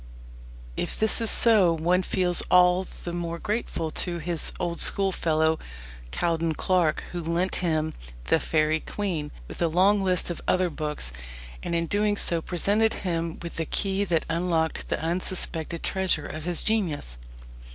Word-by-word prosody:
If - - -2
this 220 +1 +4
is 225 - +3
so, 205 -8 +5
one 175 +3 +2
feels 180 -1 0
all 180 +1 +5 0.2
the 175 - -4
more 170 -1 -3
grateful 205 -5 -3
to 175 +2 0
his 170 0 -2
old 170 -1 -2
schoolfellow, 160 -5 +2 0.5
Cowden 165 - 0
Clarke, 180 -3 +1
who 175 - -4
lent 170 +3 -1
him 160 -3 0 0.3
The 165 - +3
Faëry 155 0 +1
Queene, 175 -8 -3 0.2
with - - -9
a 170 - +3
long 195 +5 +3
list 180 -2 +2
of 175 - -6
other 185 -1 +2
books, 150 - -2 0.5
and 170 - -3
in 170 0 +1
doing 205 +3 +1
so 170 -4 +3
presented 205 +6 +1
him 165 -2 -2
with 170 - -7
the 165 - -1
key 195 0 +1
that 165 -4 0
unlocked 165 -1 -1
the - - -1
unsuspected 170 -1 -2
treasure 190 -6 0
of 155 +1 -6
his 175 -1 -2
genius. 160 - -1
170 Hz, 155 wpm, -26 LUFS, 160-185 Hz, 0.5 s, so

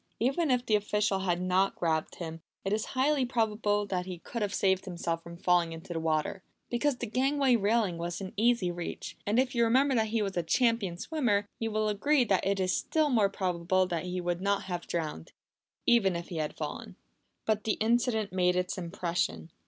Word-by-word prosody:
Even 275 +7 +1
if 250 -1 +2
the 215 - +3
official 210 -1 +1
had 180 -2 0
not 185 +2 +2
grabbed 160 -2 -1
him, 165 -1 -6 0.2
it 195 - 0
is 215 0 0
highly 280 +1 +3
probable 215 -4 +1
that 185 -2 -3
he 180 -1 -5
could 230 +7 -6
have 205 -1 0
saved 190 -1 +1
himself 170 -2 -3
from 170 0 -10
falling 175 -2 +2
into 165 +2 -7
the 165 - -2
water, 160 +3 -1 0.3
because 265 +3 +1
the - - -3
gangway 265 +2 +2
railing 210 -4 +1
was 170 +1 -3
in 195 0 -6
easy 220 -4 +2
reach; 175 -1 -6
and 210 +3 +2
if 255 0 +2
you 235 -1 +3
remember 265 +4 +3
that 220 -3 +2
he 220 0 0
was 195 -1 -3
a 175 - +1
champion 210 0 +1
swimmer, 220 - 0
you 225 - -1
will 215 0 0
agree 260 +7 +3
that 195 -6 +1
it 195 0 +1
is 185 -1 +1
still 310 -2 +1
more 215 -5 +4
probable 185 -1 0
that 175 -2 -3
he 180 0 -3
would 175 0 -2
not 200 0 +1
have 180 -2 -3
been - - -17
drowned, 155 - -4 0.5
even 195 -7 +4
if 170 0 -5
he 170 - -5
had 155 -1 -3
fallen. - - -5 0.5
But 215 -1 +1
the 215 - +2
incident 220 -2 +1
made 180 -1 +2
its 180 +1 -1
impression. 170 -2 -2
195 Hz, 205 wpm, -30 LUFS, 175-230 Hz, 0.5 s, more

